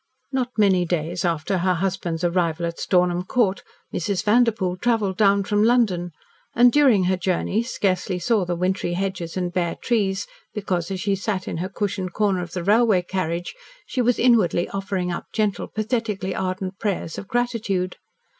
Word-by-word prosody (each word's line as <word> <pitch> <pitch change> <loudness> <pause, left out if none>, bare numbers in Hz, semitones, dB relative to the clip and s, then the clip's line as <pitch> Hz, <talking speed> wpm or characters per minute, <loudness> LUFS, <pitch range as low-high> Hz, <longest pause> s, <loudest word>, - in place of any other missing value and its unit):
Not 260 -2 0
many 195 -4 +4
days 170 0 -2
after 170 +2 0
her 185 +1 +2
husband's 175 -2 -2
arrival 170 -1 +1
at 170 0 -4
Stornham 180 -1 +2
Court, 200 -1 +1 0.3
Mrs. 190 +2 -1
Vanderpoel 210 -5 +2
travelled 215 -3 +1
down 200 0 +4
from 205 +1 +1
London, 215 -7 +2 0.5
and, 245 +1 +6
during 260 -9 +5
her 185 +1 +2
journey, 185 +4 0
scarcely 195 -6 -1
saw 210 +3 +1
the 175 0 -2
wintry 180 0 -1
hedges 185 -2 -3
and 180 -1 -2
bare 175 -2 0
trees, 200 -4 0 0.3
because, 185 -4 -2
as 190 -1 -3
she 200 +1 0
sat 195 -1 -3
in - - -3
her 185 +3 -3
cushioned 190 -2 -3
corner 200 -4 +1
of 175 -1 -7
the 180 - -3
railway 210 -1 +4
carriage, 175 -2 -3 0.3
she 255 - -1
was 245 0 +2
inwardly 215 -8 +3
offering 195 -2 -2
up 175 - -5
gentle, 210 -4 0
pathetically 215 -4 -2
ardent 185 0 -3
prayers 195 -6 -2
of 200 - -9
gratitude. 220 -7 -1
190 Hz, 165 wpm, -23 LUFS, 180-210 Hz, 0.5 s, and